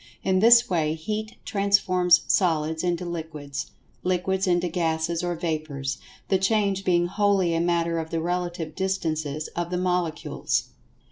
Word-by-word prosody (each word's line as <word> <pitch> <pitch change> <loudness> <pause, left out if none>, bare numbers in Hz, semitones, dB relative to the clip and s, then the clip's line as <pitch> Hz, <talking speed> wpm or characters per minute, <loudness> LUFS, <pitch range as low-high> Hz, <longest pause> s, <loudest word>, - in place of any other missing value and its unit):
In 185 -1 +2
this 235 +3 +7
way 160 -4 0
Heat 215 +6 -4
transforms 185 -3 +3
Solids 160 -3 +1
into 175 0 -1
Liquids; 160 -5 -5 0.3
Liquids 190 +2 0
into 175 0 +2
Gases 165 0 -1
or 175 0 -1
Vapors, 155 -5 -3 0.3
the 190 - +2
change 195 -1 +1
being 175 -2 +2
wholly 195 -2 +2
a 165 - +1
matter 170 -1 +1
of 160 0 -5
the 165 - -1
relative 175 -1 -3
distances 155 -5 -2
of 175 0 -4
the 180 - -2
Molecules. 180 -3 -1
175 Hz, 140 wpm, -25 LUFS, 160-190 Hz, 0.3 s, this